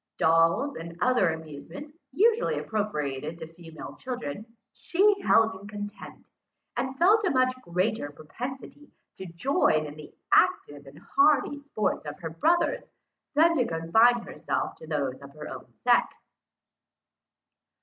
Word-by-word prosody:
Dolls 165 - +3
and 165 +1 -7
the - - -1
other 245 -8 +3
amusements 160 - -8 0.2
usually 455 +4 +2
appropriated 155 -8 -3
to - - -7
female 165 -2 -10
children, 235 - -6 0.3
she 400 +3 +2
held 225 -8 +4
in 190 +2 -11
contempt; 205 0 -9 0.5
and 260 +2 -3
felt 415 +7 +5
a 380 - +2
much 255 -3 +2
greater 185 -4 -1
propensity 250 - -8 0.3
to 190 - -7
join 170 - +1
in 145 - -7
the 150 -1 -11 0.2
active 145 -1 +2
and 140 +2 -13
hardy 300 - +2
sports 275 -7 -2
of 145 0 -6
her 165 -2 -6
brothers, 325 - +1 0.4
than 330 +3 +5
to 260 - +2
confine 220 +9 +3
herself 150 +2 -3
to 160 - -12
those 140 -4 -2
of 140 +1 -13
her 150 0 -8
own - - -9
sex. - - +3
205 Hz, 140 wpm, -27 LUFS, 160-265 Hz, 0.5 s, felt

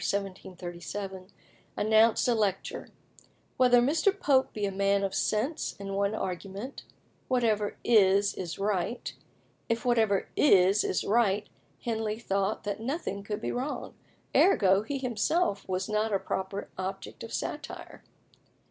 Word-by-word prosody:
1737) 190 0 -5 0.5
announced 220 +2 +4
a 245 - +4
lecture, 205 -4 -1 0.7
"Whether 245 -1 +6
Mr. 330 +9 +2
Pope 270 -5 +3
be 210 -1 -2
a 195 - -1
man 200 +1 +1
of 195 - -1
sense, 245 +9 -1
in 195 0 -5
one 200 +2 0
argument 195 +7 -5 0.5
'Whatever 220 -5 +1
is 200 -2 +4
is 175 -3 -5
right.'" 200 +3 -2 0.6
If 230 +1 -1
whatever 220 -5 +2
is 195 -6 +5
is - - 0
right, 210 -2 +2 0.4
Henley 220 -2 -2
thought 200 -2 -1
that 205 0 -3
nothing 235 - -3
could 210 +1 -5
be - - -2
wrong; 260 +4 -4 0.4
ergo, 195 - +5
he 275 +6 -3
himself 250 - 0
was 185 0 -1
not 215 +1 0
a 200 - +3
proper 190 +1 -4
object 190 +1 -5
of - - -8
satire. - - -6
205 Hz, 130 wpm, -29 LUFS, 195-235 Hz, 0.7 s, Whether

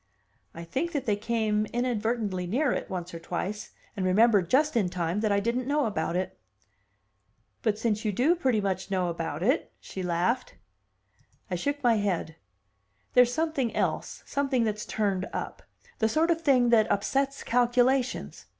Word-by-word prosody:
"I 170 - -7
think 270 - -3
that 285 -4 -2
they 210 - +2
came 215 -1 0
inadvertently 225 -6 -1
near 255 - +1
it, - - -3
once 180 -2 -5
or 165 - -6
twice, 185 +5 -4 0.3
and 195 - -2
remembered 195 -1 +4
just 295 +5 +3
in 205 -6 +2
time 175 +1 -2
that 215 -1 +1
I 200 - +3
didn't 235 +4 -1
know 290 0 +2
about 170 -5 -2
it." 185 +1 -3 1.2
"But 215 -2 +1
since 220 -1 -1
you 215 - 0
do 250 - +1
know 345 - +5
pretty 260 -10 +1
much 190 -1 -2
about 170 -4 -2
it!" 260 - +1
she 190 - -7
laughed. 180 +8 -1 1.0
I - - +1
shook 285 +10 -2
my 235 -2 +4
head. 185 -6 -1 0.8
"There's 250 -1 +6
something 310 -5 -1
else, - - -2
something 275 -3 0
that's 215 -1 -2
turned 200 -3 -1
up; - - -5 0.4
the 220 - +2
sort 320 +6 +2
of 330 -1 0
thing 260 -6 +4
that 220 -2 +4
upsets 275 +7 0
calculations. 245 +2 +1
220 Hz, 165 wpm, -28 LUFS, 190-255 Hz, 1.2 s, There's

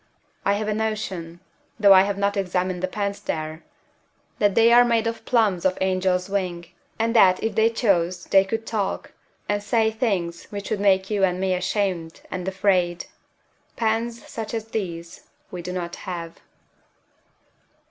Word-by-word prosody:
I 200 - +3
have 210 +1 -2
a 215 - 0
notion 195 -6 -3 0.4
though 200 -2 +8
I 190 - +8
have 200 +1 -1
not 200 +1 0
examined 185 -2 -1
the 185 - 0
pens 200 +1 -3
there 155 0 -4 0.8
that 205 -2 +2
they 230 +1 +6
are 245 +1 +8
made 230 -2 +2
from 230 - 0
plumes 215 -7 +2
of 185 -1 +1
an - - -1
angel's 185 -1 +1
wing; 185 -4 -2 0.3
and 230 +1 0
that 185 -5 +5
if 225 - 0
they 220 +1 +4
chose 185 -7 +1
they 195 -1 +5
could 225 +3 -4
talk, 210 -4 -3 0.4
and 205 0 0
say 220 +1 +1
things 195 -7 -2
which 200 -1 -7
would 215 - 0
make 195 0 +2
you 205 -2 +1
and 180 -1 +2
me 190 0 +1
ashamed 180 -3 -2
and 185 0 -4
afraid. 185 -2 +1 0.7
Pens 230 0 -1
such 225 0 -5
as 225 0 -5
these 170 -6 -5 0.2
we 180 - -5
do 180 +1 -6
not 175 -2 -4
have. 170 -3 -7
195 Hz, 170 wpm, -23 LUFS, 180-220 Hz, 0.8 s, though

